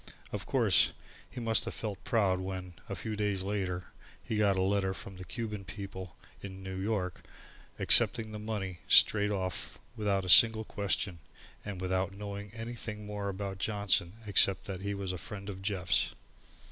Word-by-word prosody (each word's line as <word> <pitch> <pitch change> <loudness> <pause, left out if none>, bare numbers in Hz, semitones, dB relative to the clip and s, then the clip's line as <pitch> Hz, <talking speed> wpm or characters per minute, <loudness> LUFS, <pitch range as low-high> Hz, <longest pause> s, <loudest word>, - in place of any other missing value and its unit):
Of - - -5
course, - - +4 0.4
he 130 - -7
must 115 -2 +3
have - - -5
felt 105 -3 -5
proud 100 -5 +2
when, 95 -1 -5 0.2
a - - -3
few 110 - -4
days 100 -2 -1
later, 95 -3 -2 0.4
he 110 - -3
got 100 -2 +3
a - - +2
letter 95 -1 +1
from 95 -1 -9
the 95 - -7
Cuban 105 +2 -5
people, 95 -3 -8 0.3
from 95 -1 -8
New 95 0 -5
York, 95 -2 -2 0.6
accepting 110 -1 +5
the 105 - -6
money 100 -4 -4
straight 105 -1 +6
off 95 -4 -3 0.2
without 100 -4 0
a - - -5
single 110 +3 +7
question, 100 -4 -2 0.4
and 100 -3 -6
without 95 +1 -1
knowing 100 0 -6
anything 115 -2 -6
more 105 -1 -4
of 95 0 -5
Johnson 100 -4 +1
except 100 -1 +4
that 95 -2 -6
he 100 +1 -2
was 100 -2 -3
a 90 - -5
friend 100 +1 -7
of 95 -1 -9
Jeff's. 95 - +1
100 Hz, 170 wpm, -31 LUFS, 95-105 Hz, 0.6 s, single